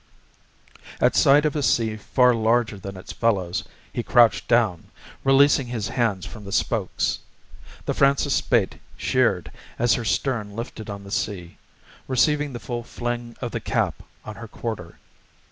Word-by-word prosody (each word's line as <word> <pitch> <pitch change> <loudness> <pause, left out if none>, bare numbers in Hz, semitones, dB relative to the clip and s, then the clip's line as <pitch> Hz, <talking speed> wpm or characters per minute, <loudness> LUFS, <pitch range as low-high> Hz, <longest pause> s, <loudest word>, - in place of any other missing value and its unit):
At - - +3
sight 145 +2 +5
of 150 - 0
a 150 - 0
sea 115 -4 +2
far 125 +4 +3
larger 115 -2 +1
than 95 0 -7
its 95 - -9
fellows, 95 -7 0 0.3
he - - -1
crouched 120 -1 +4
down, 110 -8 +2 0.4
releasing 135 -1 +4
his 115 -3 -3
hands 115 -7 0
from 100 +4 -10
the 100 - -8
spokes. - - 0 0.7
The - - 0
Francis 140 0 +3
Spaight 115 -6 +1 0.2
sheered - - +1 0.3
as 120 0 +3
her 120 - -1
stern 110 -3 -1
lifted 115 -1 -6
on 100 0 -6
the 100 - -11
sea, 90 -5 -3 0.5
receiving 145 +3 +2
the 120 - -6
full 120 -1 -4
fling 120 0 -5
of - - -3
the - - -3
cap - - -1 0.2
on 110 -2 -8
her 115 - -8
quarter. 105 -7 -6
115 Hz, 155 wpm, -24 LUFS, 105-125 Hz, 0.7 s, sight